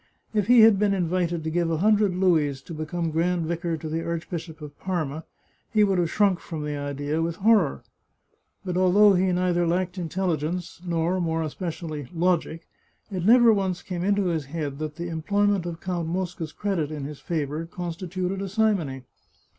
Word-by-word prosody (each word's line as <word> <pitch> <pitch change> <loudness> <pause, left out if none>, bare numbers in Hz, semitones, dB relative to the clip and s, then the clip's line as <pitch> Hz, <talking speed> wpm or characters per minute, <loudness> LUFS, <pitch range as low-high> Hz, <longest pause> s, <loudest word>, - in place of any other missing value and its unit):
If 210 -3 +1
he 245 -1 +7
had 220 -3 +7
been 205 -1 +2
invited 175 -2 0
to 160 - -2
give 170 0 +1
a 165 - 0
hundred 205 0 +3
louis 160 -7 +2
to 170 - -9
become 160 +1 -3
grand 170 +1 0
vicar 170 0 -2
to 160 - -7
the 160 +1 -2
Arch 170 -1 -3
bishop 165 -2 -6
of 150 -2 -9
Parma, 160 -5 -3 0.5
he 215 -2 +4
would 195 -3 +2
have 170 -2 +1
shrunk 195 -2 +2
from 155 -3 -6
the 150 0 -3
idea 145 +2 -2
with 165 0 -1
horror. 195 - +3 0.8
But 180 -1 -2
although 195 +3 +6
he 185 0 +2
neither 175 -1 +1
lacked 180 +2 -1
intelligence 175 0 -2
nor, 170 +1 0
more 165 -1 0
especially, 155 -3 -5
logic, 165 -1 0 0.4
it 185 -3 -3
never 235 +1 +7
once 190 -3 -1
came 180 -2 -4
into 200 0 +2
his 165 -5 -1
head 145 -1 -4
that 155 -1 -4
the 170 +2 -5
employment 200 +3 +1
of 170 -1 -5
Count 175 -3 -2
Mosca's 175 -2 -3
credit 190 -7 -2
in 150 -3 -5
his 150 0 -7
favour 155 0 -3
constituted 180 +2 -4
a 195 - -4
simony. 185 - 0
175 Hz, 180 wpm, -25 LUFS, 160-185 Hz, 0.8 s, he